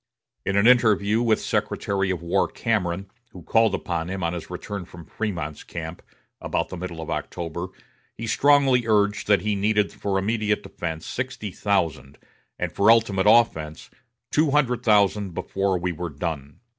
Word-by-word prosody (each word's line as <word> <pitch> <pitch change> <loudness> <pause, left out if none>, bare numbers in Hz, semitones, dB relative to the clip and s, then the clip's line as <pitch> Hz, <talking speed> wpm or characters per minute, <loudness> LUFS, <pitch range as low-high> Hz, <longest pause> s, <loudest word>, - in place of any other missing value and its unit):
In 100 - +1
an 100 - +4
interview 110 -3 +4
with 115 -2 +2
Secretary 95 -1 -1
of 90 -3 -2
War 90 +3 +1
Cameron, 95 -4 -2 0.2
who 90 - -11
called 110 +6 +3
upon 85 -1 -3
him 95 0 -4
on 85 0 0
his 85 - -6
return 100 -2 -5
from 85 -1 -12
Frémont's 85 -5 -4
camp, 85 0 -7 0.4
about - - -2
the - - -6
middle 85 -2 -6
of 80 - -6
October, 85 +3 -4 0.5
he 115 - -5
strongly 135 -1 +3
urged 105 -1 +2
that 100 -4 +4
he 105 +2 0
needed 105 +1 +1
for 100 -1 -2
immediate 105 +1 0
defense 80 -2 -5
sixty 130 -5 -4
thousand, 80 -10 -1 0.4
and - - -2
for 100 +2 +3
ultimate 105 -4 +4
offense 80 -10 +2 0.4
"two 155 0 +3
hundred 130 -4 +2
thousand 105 -4 +2
before 95 -1 -1
we 90 +1 -2
were 85 +1 -5
done." 75 0 -5
100 Hz, 160 wpm, -24 LUFS, 85-110 Hz, 0.5 s, an